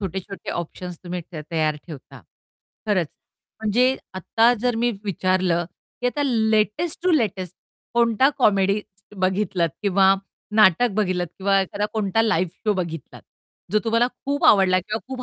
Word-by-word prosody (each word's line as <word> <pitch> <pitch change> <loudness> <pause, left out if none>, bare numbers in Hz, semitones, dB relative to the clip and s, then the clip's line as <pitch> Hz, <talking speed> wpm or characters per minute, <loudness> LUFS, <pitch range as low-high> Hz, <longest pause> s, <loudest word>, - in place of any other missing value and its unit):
छोटे-छोटे 195 +1 -5
ऑप्शन्स 175 +1 -6
तुम्ही 180 0 -4
तयार 155 0 -1
ठेवता. 150 -6 -11 0.7
खरंच. 185 -7 +1 0.5
म्हणजे 245 +5 +2 0.2
आता 225 +6 +3
जर 245 -2 0
मी 240 - +3
विचारलं, 185 -2 +1 0.4
की 245 - 0
आता 290 +4 -1
लेटेस्ट 220 - +1
टू 365 - +2
लेटेस्ट 190 - 0 0.4
कोणता 235 +2 +4
कॉमेडी 200 -3 +3 0.4
बघितलात? 185 -2 0
किंवा 195 -1 +4 0.4
नाटक 215 +3 +5
बघितलात 185 -4 0
किंवा 195 0 +3
एखादा 205 +2 -2
कोणता 215 0 +1
लाईव्ह 185 -6 +1
शोज 210 -1 +2
बघितलात? 165 -5 -5 0.5
जो 215 - +4
तुम्हाला 230 +2 +3
खूप 280 +2 -4
आवडला 190 -2 +5
किंवा 215 +4 -4
खूप 260 -1 -5
200 Hz, 135 wpm, -23 LUFS, 180-225 Hz, 0.7 s, नाटक